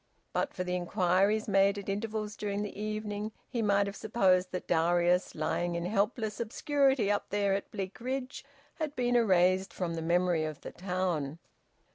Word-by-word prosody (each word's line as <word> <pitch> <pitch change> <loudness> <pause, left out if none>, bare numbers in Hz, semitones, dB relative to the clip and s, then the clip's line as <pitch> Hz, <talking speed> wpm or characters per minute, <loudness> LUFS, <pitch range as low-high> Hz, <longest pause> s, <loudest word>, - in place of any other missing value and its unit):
But - - 0
for 180 - -2
the 180 0 -2
inquiries 185 +4 +2
made 195 0 +4
at 200 - -7
intervals 210 +1 -3
during 205 0 -2
the 210 - -6
evening, 215 0 -4
he 240 -3 -2
might 200 -1 +3
have 200 0 -5
supposed 190 -5 +2
that 180 - -5
Darius, 175 +2 +2
lying 175 +3 -1
in 170 0 -2
helpless 210 +2 0
obscurity 265 -1 +2
up 205 - -1
there 200 -1 +1
at 195 - -2
Bleak 195 +2 -6
ridge, 260 +1 -4 0.4
had 305 -2 -3
been 245 -1 +1
erased 185 -4 +3
from 175 -3 -3
the 165 - -3
memory 170 0 +2
of 155 -2 -5
the - - -7
town. 180 -5 -2
200 Hz, 170 wpm, -30 LUFS, 180-215 Hz, 0.4 s, made